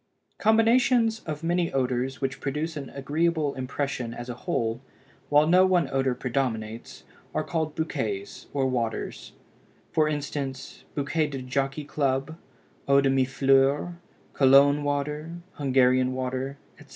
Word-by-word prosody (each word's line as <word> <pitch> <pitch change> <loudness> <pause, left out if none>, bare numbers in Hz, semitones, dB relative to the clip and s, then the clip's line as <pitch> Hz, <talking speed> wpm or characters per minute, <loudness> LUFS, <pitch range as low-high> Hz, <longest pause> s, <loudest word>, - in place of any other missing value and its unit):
Combinations 225 +1 +3
of 155 0 -4
many 175 0 +1
odors 130 -1 -1
which 135 -1 -2
produce 150 +4 -2
an 140 -3 -6
agreeable 150 +1 0
impression 130 -2 -3
as 120 +1 -7
a - - -3
whole, 115 0 -2 0.5
while 145 +1 +5
no 180 +4 +5
one 185 -2 +3
odor 135 -1 +1
predominates, 115 -4 -3 0.3
are - - +1
called 160 -2 -2
bouquets 110 -11 -3
or 140 -2 0
waters; 120 -4 -3 0.6
for 155 -1 +2
instance, 140 -2 -5
Bouquet 150 +2 0
de 135 -3 -6
Jockey 135 +3 -2
Club, 140 +1 -1 0.5
Eau 140 0 +5
de 135 -1 +2
Mille 135 -1 +2
Fleurs, 135 +4 +2 0.4
Cologne 140 +2 +5
Water, 150 +3 -2 0.2
Hungarian 130 -2 +3
Water, 130 +1 -3 0.2
etc. 145 - -16
140 Hz, 130 wpm, -26 LUFS, 130-155 Hz, 0.6 s, while